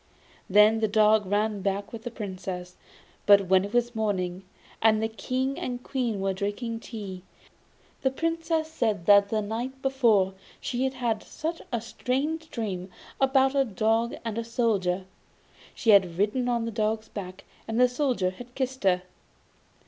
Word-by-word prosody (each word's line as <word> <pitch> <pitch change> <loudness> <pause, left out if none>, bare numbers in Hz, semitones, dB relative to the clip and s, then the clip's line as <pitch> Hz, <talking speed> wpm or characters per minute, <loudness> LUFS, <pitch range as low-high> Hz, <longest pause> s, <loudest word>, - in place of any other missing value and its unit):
Then 210 +3 +6
the 220 - +2
dog 215 -1 +4
ran 205 +1 0
back 200 +2 -2
with 230 - -6
the 240 - -5
Princess. 185 -5 -6 0.5
But 200 -2 +6
when 190 0 +5
it 200 - -5
was 240 0 +1
morning, 190 -4 -1 0.4
and 215 -1 +5
the 220 - +1
King 255 +4 -2
and 245 0 -4
Queen 240 -6 -2
were 195 0 0
drinking 205 +4 -3
tea, 200 -6 -7 0.8
the 265 - +3
Princess 325 +2 -1
said 215 - -1
that 200 0 +6
the 215 0 0
night 240 +5 -4
before 230 -8 +3 0.3
she 250 +1 -1
had 265 0 -2
had 235 -4 -1
such 330 +2 -5
a 235 - 0
strange 290 +7 -2
dream 195 -5 -4 0.3
about 270 0 +4
a 275 -1 +3
dog 225 +1 0
and 225 0 -2
a - - -2
Soldier: 205 -6 0 0.7
she 225 - +3
had 185 -4 +5
ridden 220 +6 +1
on 235 -1 0
the 230 - -3
dog's 215 0 -1
back, 185 -2 -7 0.2
and 225 +1 -1
the 250 - +7
Soldier 245 -8 0
had 245 +6 -12
kissed 260 -2 -3
her. 180 -2 +3
220 Hz, 165 wpm, -27 LUFS, 200-250 Hz, 0.8 s, the